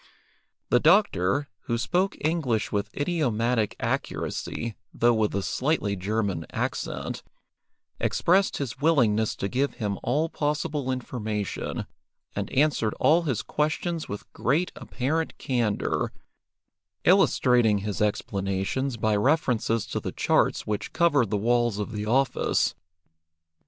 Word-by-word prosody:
The 125 - +6
doctor, 145 - +3 0.2
who 115 - 0
spoke 185 +10 0
English 150 -9 0
with 100 0 -1
idiomatic 125 - 0
accuracy, 115 -1 -3 0.2
though 120 +1 +3
with 110 -3 +1
a 100 - 0
slightly 125 -7 0
German 100 -3 -2
accent, - - -3 0.8
expressed 190 +3 +2
his 130 -2 -4
willingness 115 -9 +3
to 100 - -2
give 135 +6 -1
him 105 -4 -3
all 150 +7 +1
possible 150 -3 -2
information, 110 -5 -3 0.5
and - - -3
answered 135 -6 +2
all 155 +6 +4
his 135 -10 -1
questions 155 +2 -1
with 100 - -7
great 155 +9 +1
apparent 155 +6 -2
candour, 120 -5 0 0.9
illustrating 120 -4 +4
his 105 -1 -3
explanations 100 +5 -1
by 110 0 +1
references 115 -2 +1
to - - -3
the - - -4
charts - - +1
which 105 -1 -3
covered 145 - +3
the 105 - 0
walls 120 0 +2
of 105 +1 -3
the 105 -1 -4
office. 130 +4 +2
120 Hz, 120 wpm, -26 LUFS, 105-150 Hz, 0.9 s, The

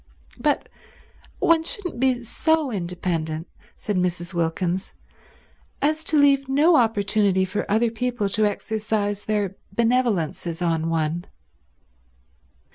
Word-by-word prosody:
"But - - +1 0.7
one 330 -1 +3
shouldn't 355 -4 -5
be 255 -1 +2
so 310 +4 +1
independent," 170 -4 -3 0.3
said 210 -3 -2
Mrs. 180 0 -1
Wilkins, 175 +2 -1 0.9
"as 310 +3 0
to 310 - +2
leave 275 -2 +4
no 305 +5 +5
opportunity 205 -5 +2
for 205 +3 -3
other 220 +2 +2
people 240 -2 -1
to 215 +2 +2
exercise 205 -1 -2
their 205 -3 -1 0.2
benevolences 220 -9 0
on 165 -2 0
one." 165 +1 -1
210 Hz, 110 wpm, -23 LUFS, 180-250 Hz, 0.9 s, no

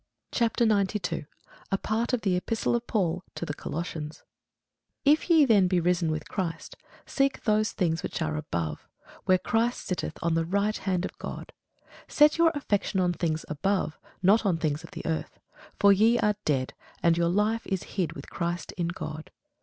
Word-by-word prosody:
CHAPTER 235 0 +2
92 195 -6 0 0.5
A 195 - +2
PART 220 +4 -1
OF 250 -3 0
THE 190 -4 +1
EPISTLE 225 +6 0
OF 240 0 -3
PAUL 180 -4 0
TO - - -4
THE 150 - -3
COLOSSIANS 160 -1 -5 0.8
IF 300 +5 +4
ye 320 -4 +7
then 205 -7 +5
be 180 -1 +2
risen 175 -1 +1
with 155 -1 -3
Christ, 180 -5 -4 0.3
seek 275 0 0
those 215 -1 +2
things 165 -3 0
which - - -4
are 155 -1 -1
above, 85 - -3 0.4
where 185 - +5
Christ 230 +5 0
sitteth 180 -4 -3
on 170 0 +1
the 165 0 +2
right 200 +5 0
hand 185 -2 -1
of - - -6
God. - - -7 0.6
Set 300 +2 +4
your 335 -1 +6
affection 205 -7 0
on 180 -1 +2
things 160 -2 -2
above, 155 +2 -1 0.2
not 205 +5 +5
on 190 -5 +2
things 155 -2 -1
on - - -10
the - - -7
earth. 160 -1 -3 0.4
For 200 0 +7
ye 225 +4 +4
are 210 -3 +2
dead, 130 -4 0 0.3
and 170 -1 +5
your 170 0 +2
life 210 +4 +1
is 190 -2 -1
hid 185 -5 -1
with 140 - -9
Christ 170 +1 -3
in 170 -2 0
God. 155 -2 -6
185 Hz, 180 wpm, -27 LUFS, 165-215 Hz, 0.8 s, ye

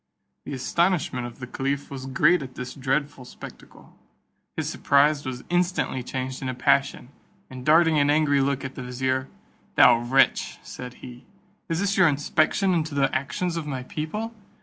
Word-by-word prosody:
The - - -6
astonishment 140 -2 0
of 120 - -12
the 125 - -7
caliph 140 +3 -3
was 135 -1 -6
great 155 +6 +3
at 130 -2 -8
this 125 0 -6
dreadful 135 0 -2
spectacle. 125 - -13 0.6
His - - -2
surprise 145 0 +2
was 125 -1 -5
instantly 175 -6 0
changed 130 +1 -5
into 130 -2 -3
passion, 140 -1 +1 0.4
and 130 -1 -8
darting 160 +1 +4
an 145 0 +3
angry 145 -2 +3
look 140 0 -1
at 130 - -6
the - - -7
vizier, 130 +1 -2 0.5
"Thou 115 - +7
wretch," 125 +3 +2
said 125 0 -9
he, 125 0 -11 0.4
"is 165 0 0
this 200 0 0
your 185 -2 +6
inspection 155 +6 +1
into 160 -3 -1
the 135 -1 +1
actions 140 +7 -2
of 160 -2 -4
my 130 -3 -4
people? 210 - -4
140 Hz, 165 wpm, -25 LUFS, 130-155 Hz, 0.6 s, Thou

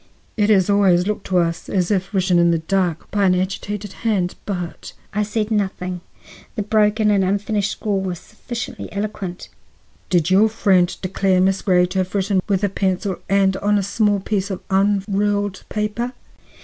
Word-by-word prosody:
"It 210 -1 +2
has 190 -4 +4
always 195 -3 +4
looked 210 -1 -3
to 185 - +1
us 170 -1 0
as 185 -1 0
if 190 -1 0
written 185 -3 +2
in 170 0 +4
the 170 - +3
dark, 175 0 -1
by 205 -1 +2
an 185 -1 +4
agitated 195 +2 -3
hand; 200 -6 0
but—" 180 -4 -5 0.2
I 210 - 0
said 215 +1 -2
nothing; 185 -4 -2 0.5
the 210 - -1
broken 210 0 +2
and 200 -2 +3
unfinished 205 +2 0
scrawl 205 -2 -2
was 185 -2 -3
sufficiently 235 +6 -7
eloquent. 200 -3 -5 0.6
"Did 175 -1 +2
your 205 +4 +5
friend 190 -5 +3
declare 190 0 +1
Miss 190 +1 +2
Grey 180 -2 +3
to 185 +2 -2
have 185 +1 -2
written 195 -1 +1
with 195 0 +1
a - - +4
pencil 190 0 -1
and 195 -1 +3
on 205 +1 +1
a 200 - 0
small 205 +1 +1
piece 200 0 -2
of 190 - -4
unruled 200 0 +1
paper?" 215 +4 -2
195 Hz, 175 wpm, -20 LUFS, 185-210 Hz, 0.6 s, your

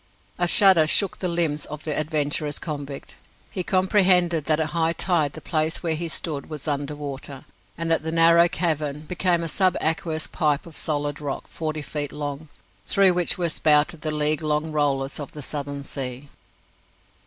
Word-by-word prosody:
A 175 - +3
shudder 180 -4 +7
shook 195 +4 +2
the 185 - -2
limbs 165 -4 -1
of 150 0 -8
the 155 -2 -2
adventurous 150 -1 -1
convict. 145 -3 -7 0.3
He 185 - -3
comprehended 180 -4 +2
that 155 -1 +2
at 155 -1 -1
high 165 0 +1
tide 165 -6 +1
the - - -9
place 160 +1 -2
where 165 -2 0
he 170 +2 -3
stood 155 -3 -3
was 155 -1 -6
under 145 0 -2
water, 140 -2 -7 0.3
and 165 0 -2
that 165 - +2
the 160 +1 -4
narrow 170 +1 +5
cavern 150 -4 -1
became 175 +1 0
a - - -3
subaqueous 160 -3 0
pipe 150 -2 -1
of 165 -2 -12
solid 145 -1 -1
rock 140 -2 -5
forty 155 -2 -4
feet 145 0 -4
long, 145 +1 -6 0.4
through 195 -2 +4
which 175 -1 +1
were 175 -2 0
spouted 155 0 +3
the 155 - -3
league 150 +1 0
long 155 +1 -1
rollers 140 -2 -1
of 145 - -8
the 150 - -7
Southern 140 0 -4
Sea. 135 0 -5
155 Hz, 175 wpm, -23 LUFS, 145-170 Hz, 0.4 s, shudder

